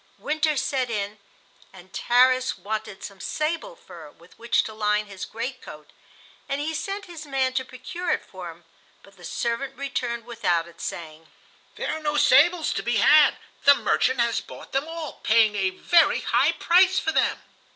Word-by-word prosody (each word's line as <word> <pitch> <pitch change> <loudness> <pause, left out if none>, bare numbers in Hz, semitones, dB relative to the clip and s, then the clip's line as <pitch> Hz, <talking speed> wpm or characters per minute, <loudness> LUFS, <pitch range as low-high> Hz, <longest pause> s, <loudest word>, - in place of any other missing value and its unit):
Winter 310 0 0
set 265 -2 -1
in, 205 -1 -3 0.5
and 190 0 -16
Tarras 255 +1 +3
wanted 210 +1 -5
some 195 -1 -9
sable 330 - -3
fur 165 - -13
with 170 +4 -20
which 235 0 +2
to 220 - -7
line 210 0 0
his 195 -2 -7
great 250 +3 -6
coat, 150 -1 -12 0.6
and 275 - -1
he 310 +2 -2
sent 390 +5 -4
his 330 -4 -10
man 265 -2 0
to 260 0 0
procure 345 +9 -7
it - - 0
for 185 -2 -9
him; 165 +1 -14 0.4
but 200 - -19
the 180 - -17
servant 245 +8 -3
returned 240 -4 -3
without 175 -8 -1
it, 170 - -14
saying: 160 -1 -7 0.5
"There - - -3
are 315 - -7
no 295 -1 -1
sables 315 +5 +4
to - - -2
be 240 -1 0
had. 300 +8 +6 0.3
The 280 0 +8
'merchant' 260 -2 +1
has 235 -1 +1
bought - - -12
them 275 +3 -1
all, 325 -2 -7
paying 220 -1 +4
a 195 -2 +1
very 335 - +3
high - - +2
price 375 +2 +4
for 320 - 0
them." - - 0
250 Hz, 180 wpm, -24 LUFS, 205-300 Hz, 0.6 s, The